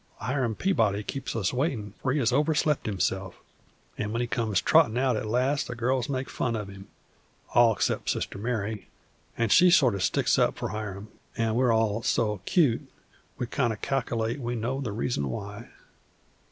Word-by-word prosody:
Hiram 125 -4 -1
Peabody 110 - +1
keeps 135 +4 -5
us 105 -2 0
waitin', 125 - -2
for 130 - 0
he 140 - +1
has 125 -4 +1
overslept 150 0 +1
himself, 95 -2 -1 0.6
an' 105 - -2
when 115 - -1
he - - 0
comes 115 -4 0
trottin' 145 -8 +4
out 130 -1 +2
at 110 - -3
last 130 +5 +1
the - - -5
girls 125 +2 0
make 130 -1 -2
fun 115 -2 -2
of 105 -3 -4
him, 95 0 -11 0.7
all 120 -1 +6
except 100 - -1
Sister - - -2
Mary, 110 -2 -3 0.5
an' 115 -1 +1
she 180 - +7
sort 145 - +5
o' 100 - -3
sticks - - +2
up - - +2
for - - -3
Hiram, 105 0 -6 0.3
an' 115 -1 +1
we're 125 +1 +3
all 110 -1 +1
so 105 -3 0
'cute 145 -10 +2 0.5
we 125 - -2
kind 120 -1 0
o' - - -3
calc'late 120 -2 -1
we 120 -1 -3
know 125 +4 -2
the 115 - -3
reason 100 - -2
why. 60 - -7
115 Hz, 180 wpm, -27 LUFS, 105-130 Hz, 0.7 s, she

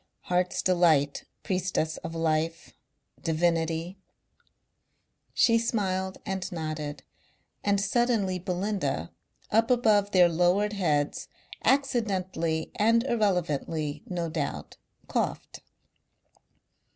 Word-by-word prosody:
"Heart's 180 0 0
delight.... 165 -6 +3 0.2
Priestess 180 -4 -1
of 165 0 -7
life.... 165 0 -1 0.5
Divinity." 165 +2 0 1.3
She 230 -1 +4
smiled 190 -5 -1
and 190 -2 -3
nodded 155 -4 -4 0.6
and 200 -1 +2
suddenly 215 -4 +1
Belinda, 180 - -2 0.4
up 225 +2 +3
above 215 -5 +3
their 185 -3 +6
lowered 180 +5 +2
heads, 150 -7 0 0.4
accidentally 190 - 0
and 230 +2 +4
irrelevantly, 165 - -1
no 175 -2 -2
doubt, 155 -3 -4 0.3
coughed. - - -2
180 Hz, 85 wpm, -28 LUFS, 160-205 Hz, 1.3 s, their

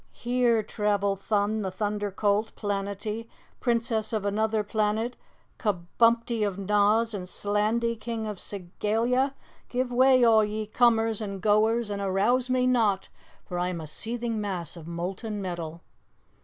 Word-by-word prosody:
"Here 240 -2 +1
travel 205 -2 0
Thun, 205 +2 0
the 190 - -2
Thunder 205 +2 -2
Colt, 205 +2 0
Planetty, 205 +2 -3 0.3
Princess 230 -2 0
of 215 -3 -1
Anuther 215 +1 +1
Planet; 215 +3 0 0.4
Kabumpty 230 +4 +1
of 200 -2 -1
Noz; 210 +3 +2
and 180 -3 -5
Slandy, 215 +4 0
King 220 0 -4
of 210 -2 -4
Segalia! 225 +8 -1 0.3
Give 250 0 -1
way, 255 0 +5
all 225 -2 +6
ye 215 +1 -2
comers 225 -1 +2
and 200 -2 -4
goers, 215 +2 +2
and 200 0 -3
arouse 210 +7 +1
me 255 0 +2
not, 225 -6 +2 0.4
for 175 -1 -4
I 180 - 0
am 180 -2 -3
a 160 - -6
seething 230 +7 -3
mass 185 -6 -4
of 165 -2 -10
molten 190 +6 -4
metal!" 170 -3 -5
215 Hz, 140 wpm, -27 LUFS, 200-230 Hz, 0.4 s, all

